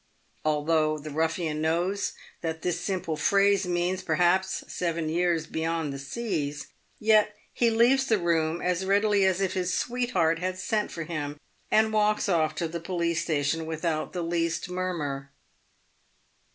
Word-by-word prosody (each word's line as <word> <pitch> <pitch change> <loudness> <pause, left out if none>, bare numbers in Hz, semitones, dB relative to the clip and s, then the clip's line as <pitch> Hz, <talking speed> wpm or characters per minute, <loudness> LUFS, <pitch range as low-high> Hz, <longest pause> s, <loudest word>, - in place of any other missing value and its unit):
Although 155 0 +2
the 155 0 -8
ruffian 160 0 -1
knows 175 +5 0 0.3
that 160 -1 -4
this 180 0 -1
simple 185 -5 -2
phrase 195 +4 +3
means, 175 +1 0
perhaps, 180 +2 +1
seven 170 -2 -2
years 170 -1 +1
"beyond 160 -2 -2
the 140 - -6
seas," 145 -2 -3 0.3
yet 215 -1 +3 0.2
he 235 - +3
leaves 245 +4 +4
the 220 - +3
room 165 -2 0
as 180 +1 0
readily 200 +1 +3
as 190 0 +2
if 190 -1 0
his 185 -2 -1
sweetheart 215 -10 +1
had 185 +1 -2
sent 210 +2 -1
for 165 - -4
him, 150 -3 -4 0.3
and 220 0 +3
walks 210 0 +2
off 160 -4 +2
to 165 - -1
the 170 +1 -5
police 170 -1 -1
station 160 0 0
with 160 +1 -4
out 155 -2 -1
the 175 -2 -3
least 170 0 -1
murmur. 155 -7 -3
170 Hz, 150 wpm, -27 LUFS, 160-190 Hz, 0.3 s, leaves